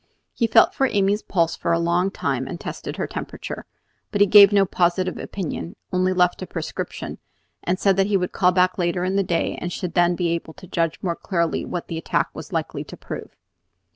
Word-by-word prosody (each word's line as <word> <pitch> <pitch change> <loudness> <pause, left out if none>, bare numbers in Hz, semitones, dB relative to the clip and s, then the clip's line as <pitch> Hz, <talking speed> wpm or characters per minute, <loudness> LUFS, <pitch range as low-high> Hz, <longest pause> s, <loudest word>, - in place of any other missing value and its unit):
He 230 - +1
felt - - +6
Amy's 205 -5 +2
pulse 165 -3 0
for 170 - -2
a 165 - +3
long 170 +3 +1
time, - - -2
and - - -6
tested - - -6
her - - -1
temperature; - - -6 0.4
but 205 - -1
he 205 - +7
gave 200 0 +8
no 200 -1 +4
positive 180 0 0
opinion, 175 -2 -5 0.2
only 185 0 +2
left 180 -1 +2
a 185 - -5
prescription, 165 -3 -5 0.4
and 180 +2 0
said 195 0 +2
that 195 0 +3
he 205 -1 +3
would 180 -1 -2
call 180 -1 +3 0.3
later 175 0 0
in 190 +1 -1
the 200 - +3
day 175 -3 -1
and 175 - -3
should 175 -1 -4
then 175 0 +3
be 175 -1 0
able 165 -1 -3
to - - -12
judge 165 -2 -1
more 170 -3 0
clearly 170 -3 -1
what 175 - -4
the 165 -1 -4
attack - - 0
was - - -9
likely - - -2
to - - -10
prove. - - -8
180 Hz, 205 wpm, -23 LUFS, 170-195 Hz, 0.4 s, gave